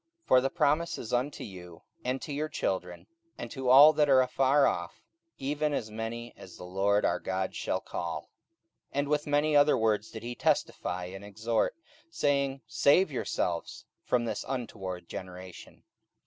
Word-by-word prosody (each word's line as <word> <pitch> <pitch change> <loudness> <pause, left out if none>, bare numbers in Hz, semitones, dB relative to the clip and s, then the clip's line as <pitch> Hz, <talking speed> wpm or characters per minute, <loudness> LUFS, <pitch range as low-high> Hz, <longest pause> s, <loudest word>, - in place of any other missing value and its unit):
44:002:039 - - -41
For 130 - +6
the 135 - 0
promise 155 +5 +1
is 110 - -6
unto 130 +4 -1
you, 90 -4 -11 0.2
and 130 +1 -1
to 145 - -5
your 155 +2 -2
children, 90 - -3 0.3
and - - -7
to 130 -3 -2
all 145 +4 +9
that 150 -1 +2
are 130 -1 +6
afar 135 +2 +3
off, 85 0 -2 0.3
even 145 +2 -1
as 110 -4 -4
many 115 +2 -5
as 90 - -12
the - - -10
LORD 100 +3 +1
our - - +1
God 95 0 -2
shall - - -2
call. - - -4
44:002:040 - - -30 0.7
And 140 +1 0
with 150 0 0
many 145 +1 +2
other 145 +1 +5
words 110 -1 +1
did 110 - -9
he 120 +1 -4
testify 90 -5 -1
and 95 +2 -8
exhort, 110 +3 -1 0.3
saying, 140 -3 0
Save 140 - +3
yourselves 90 -9 -3 0.2
from 120 -1 +1
this 115 - -3
untoward 95 -9 -5
generation. 90 -1 -9
120 Hz, 170 wpm, -29 LUFS, 95-145 Hz, 0.7 s, all